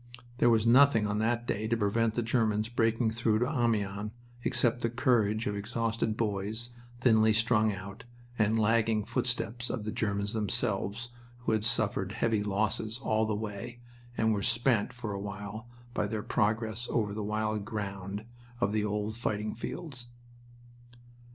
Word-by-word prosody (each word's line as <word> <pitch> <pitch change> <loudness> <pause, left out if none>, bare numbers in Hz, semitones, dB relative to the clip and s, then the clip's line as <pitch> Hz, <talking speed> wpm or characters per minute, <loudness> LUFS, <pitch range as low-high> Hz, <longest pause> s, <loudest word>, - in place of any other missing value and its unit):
There 120 - +5
was 115 -1 +3
nothing 120 -2 +6
on 105 0 0
that 115 +2 0
day 110 -1 -1
to 115 +1 +1
prevent 110 +1 +1
the 120 - 0
Germans 110 -2 +1
breaking 115 -1 +1
through 110 -1 +1
to 120 +3 +1
Amiens 105 -6 0 0.3
except 120 -1 +1
the 115 - +1
courage 115 -4 +2
of 105 - -1
exhausted 115 +1 -1
boys 110 +2 -2 0.3
thinly 110 -3 +5
strung 110 -1 +3
out, 100 +4 -8 0.3
and 110 +1 +3
the - - +2
lagging 110 0 +2
footsteps 120 0 -2
of 115 - -3
the 110 - -3
Germans 100 -3 -1
themselves, 110 0 -1 0.3
who 120 - 0
had 110 -1 +1
suffered 100 -3 +1
heavy 110 -2 +1
losses 110 +2 -1
all 110 -3 +1
the 110 - 0
way 110 +3 -5 0.4
and 110 0 +3
were 100 - -1
spent 120 0 +2
for 120 -4 -5
a 100 - -3
while 105 +3 -6 0.3
by - - 0
their 110 -2 -3
progress 110 +2 0
over 105 -4 0
the 105 - -3
wild 110 0 -1
ground 100 -1 -5 0.3
of 105 -4 +1
the 105 0 +1
old 105 +1 -2
fighting 105 -2 -2
fields. 125 +1 -6
110 Hz, 160 wpm, -30 LUFS, 105-115 Hz, 0.4 s, nothing